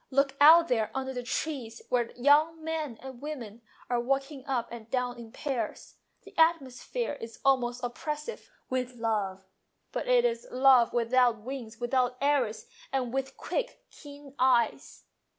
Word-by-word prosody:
" - - -48
Look 275 -1 +1
out 330 +3 +9
there 225 -6 +1
under 265 0 -2
the 250 - -3
trees 245 -2 -4
where 245 -2 +2
the 235 - -17
young 305 +5 +4
men 310 -7 -3
and 260 -2 -9
women 240 -7 -7 0.3
are 245 -1 0
walking 270 +2 -2
up 255 -4 -1
and 230 -1 -9
down 250 -1 -1
in 230 -1 -10
pairs. 250 -7 -4 0.3
The - - -15
atmosphere 320 - +1
is 230 0 -8
almost 250 -2 +2
oppressive 300 - -5 0.2
with 255 -1 -2
love, 205 -5 -2 0.5
but - - -3
it - - +4
is 475 0 -1
a - - -11
love 255 -2 +6
without 240 -1 +2
wings, 235 -2 -7
without 250 0 +1
arrows, 270 -6 +1 0.3
and 255 -3 -1
with 270 0 -3
quick, - - -4
keen 285 -1 -13
eyes. 250 -3 +1
255 Hz, 160 wpm, -29 LUFS, 240-285 Hz, 0.5 s, out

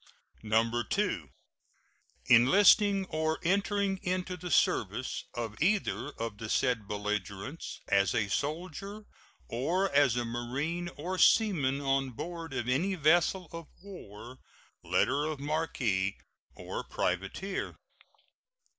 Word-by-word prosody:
2. 115 - 0 1.0
Enlisting 195 - +6
or 160 -2 -1
entering 200 +1 +1
into 180 0 -2
the 180 0 -7
service 110 - +1
of 115 -3 -4
either 195 -3 +1
of 115 -2 -5
the 110 - -6
said 120 -5 +1
belligerents 105 - -4
as 100 +3 +2
a 105 -4 +1
soldier 180 - -4 0.4
or 175 +11 0
as 140 -4 +4
a 120 -1 -1
marine 135 +9 -3
or 180 +5 -3
seaman 150 -12 +4
on 135 -1 +1
board 165 +5 -6
of 125 -3 -3
any 170 +10 +1
vessel 175 +3 +3
of 165 -2 -8 0.2
war, 125 - -11 0.4
letter 140 +4 +1
of 155 -2 -3
marque, 130 -10 -1 0.4
or - - -5
privateer. 95 - -3
145 Hz, 110 wpm, -30 LUFS, 115-180 Hz, 1.0 s, Enlisting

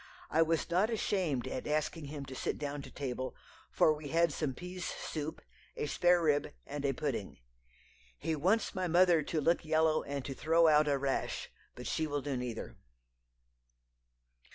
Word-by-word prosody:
I 160 - +4
was 165 0 +2
not 190 +6 +3
ashamed 185 - 0
at 130 - -4
asking 155 +1 -1
him 140 -1 -6
to 135 - -8
sit - - -2
down 145 -1 -4
to - - -10
table, 130 -2 -4 0.3
for 155 - +4
we 150 -1 -7
had 165 +1 +2
some 140 -4 -2
pease 180 +2 -7
soup, 155 -1 -4 0.3
a - - -1
sparerib, 160 -2 +3
and 145 -1 -5
a 140 - +3
pudding. - - -3 0.8
He 160 - -1
wants 190 +10 +2
my 185 -3 -1
mother 175 -1 +5
to 155 +2 -1
look 170 +4 +2
yellow 160 0 +3
and 140 -2 -4
to 140 - -4
throw 165 +4 +4
out 150 -1 +5
a 140 -1 +3
rash, 135 0 -2 0.2
but 125 - -8
she 155 +7 0
will 145 -2 -2
do 145 -2 -2
neither." 120 - -5
155 Hz, 170 wpm, -33 LUFS, 140-165 Hz, 0.8 s, mother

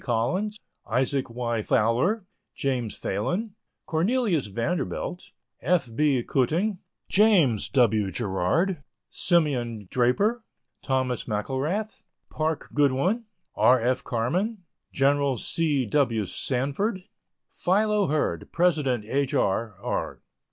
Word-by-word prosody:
Collins, 140 - -1 0.3
Isaac 130 +2 0
Y. 115 -1 -2
Fowler, 125 - +1 0.3
James 125 -5 -2
Phalen, 180 - -2 0.3
Cornelius 180 - +1
Vanderbilt, 155 - -3 0.3
F. 160 -10 +1
B. 140 -3 +2
Cuting, 170 - 0 0.3
James 185 - +3
W. 110 -6 +3
Gerard, 120 - 0 0.3
Simeon 125 - 0
Draper, 200 - +2 0.4
Thomas 130 -2 -1
McElrath, 140 - -2 0.3
Park 155 0 -2
Godwin, 145 - +2 0.3
R. 130 +1 +5
F. 125 +2 0
Carman, 180 - -1 0.3
Gen. 140 -1 +2
C. 145 -1 0
W. 115 -3 +1
Sanford, 140 - -2 0.5
Philo 210 +1 +2
Hurd, 155 +1 -1
President 150 -10 +1
H. 140 +5 -1
R. 110 -2 0
R. 125 - -3
140 Hz, 95 wpm, -26 LUFS, 120-180 Hz, 0.5 s, R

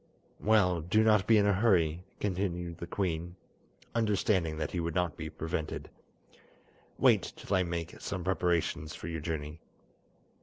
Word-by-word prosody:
"Well, 95 -6 +3
do 100 +7 +3
not 105 -4 +4
be 115 - +6
in 100 - +4
a 100 - +4
hurry," 90 -5 +2 0.2
continued 90 -4 -2
the 85 - -5
queen, 85 -2 -2 0.6
understanding 100 -7 +1
that 80 - -2
he 90 - -2
would 85 -1 -2
not 90 -4 0
be - - -5
prevented. 80 -1 -4 1.1
"Wait - - +3
till 100 - -2
I 95 - +4
make 85 -2 -4
some 95 -3 -4
preparations 85 -4 0
for - - -7
your 80 -2 -4
journey." 75 -1 -4
90 Hz, 150 wpm, -31 LUFS, 80-100 Hz, 1.1 s, be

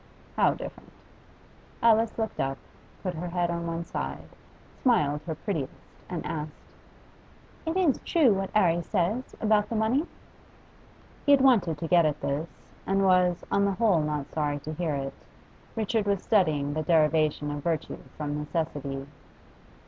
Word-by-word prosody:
'How - - +3
different?' - - -9 0.9
Alice 225 -1 +4
looked 220 -1 -3
up, 135 0 -1 0.5
put 185 -2 -2
her 175 +2 -5
head 175 0 0
on 170 0 -3
one 165 0 -3
side, - - -5 0.5
smiled 150 - +2
her 160 - -2
prettiest, 155 -6 -3 0.3
and 180 -2 -4
asked 150 -1 -6 1.0
'Is 320 - 0
it 340 -8 +2
true, 290 -10 +4
what 195 0 -2
'Arry 175 -5 +4
says 205 +8 -1
about 215 -1 +2
the 230 - -2
money?' 235 +9 +1 1.2
He 285 - +7
had 275 - +5
wanted 205 - +4
to 165 - -4
get 170 -1 +5
at 150 - -2
this, 150 +4 -2 0.4
and 195 0 +2
was, 180 -2 +3
on 200 - +3
the 200 - +1
whole, 190 -4 +3
not 150 -2 -3
sorry 145 -2 0
to 155 - -5
hear 160 -2 -1
it. 135 -1 -3 0.6
Richard 220 -1 0
was 200 -2 +1
studying 155 -9 +2
the 155 - -1
derivation 155 -2 +2
of 145 0 -4
virtue 165 0 -2 0.2
from 150 -1 -3
necessity. 145 -3 -3
170 Hz, 155 wpm, -27 LUFS, 150-210 Hz, 1.2 s, He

